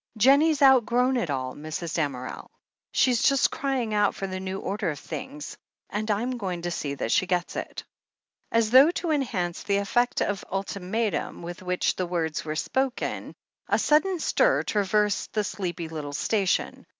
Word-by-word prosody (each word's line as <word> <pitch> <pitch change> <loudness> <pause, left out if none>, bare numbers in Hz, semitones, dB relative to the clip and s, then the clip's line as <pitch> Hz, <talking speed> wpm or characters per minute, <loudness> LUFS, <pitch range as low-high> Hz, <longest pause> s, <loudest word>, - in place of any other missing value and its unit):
Jennie's 285 +6 +5
outgrown 255 -1 +5
it 235 -10 -1
all, 130 -2 -2
Mrs. 155 +2 -5
Damerel. 140 -6 -3 0.4
She's 250 -3 +3
just 275 -1 +4
crying 260 -6 -1
out 205 -1 +2
for 195 - -4
the 185 -1 -4
new 190 0 -4
order 200 -1 -2
of 150 - -4
things 280 - -7 0.2
— - - -55
and 215 +2 -3
I'm 240 +5 0
going 180 -5 -3
to 175 - -2
see 145 -4 -3
that 115 - -3
she 185 - +3
gets 180 -1 -1
it." - - -5 0.7
As 230 -1 +2
though 265 +5 +8
to 345 -1 -2
enhance 200 - -1
the 200 -1 0
effect 240 +5 +1
of 200 -2 -1
ultimatum 195 0 -2
with 175 +2 -7
which 180 0 0
the 185 - -1
words 165 -3 -2
were 155 -1 -4
spoken, 265 +9 -2 0.3
a - - +3
sudden 355 +5 +3
stir - - +2
traversed 210 0 0
the 215 - +1
sleepy 175 -5 -4
little 150 -3 -6
station. 195 +5 0
200 Hz, 170 wpm, -26 LUFS, 175-250 Hz, 0.7 s, though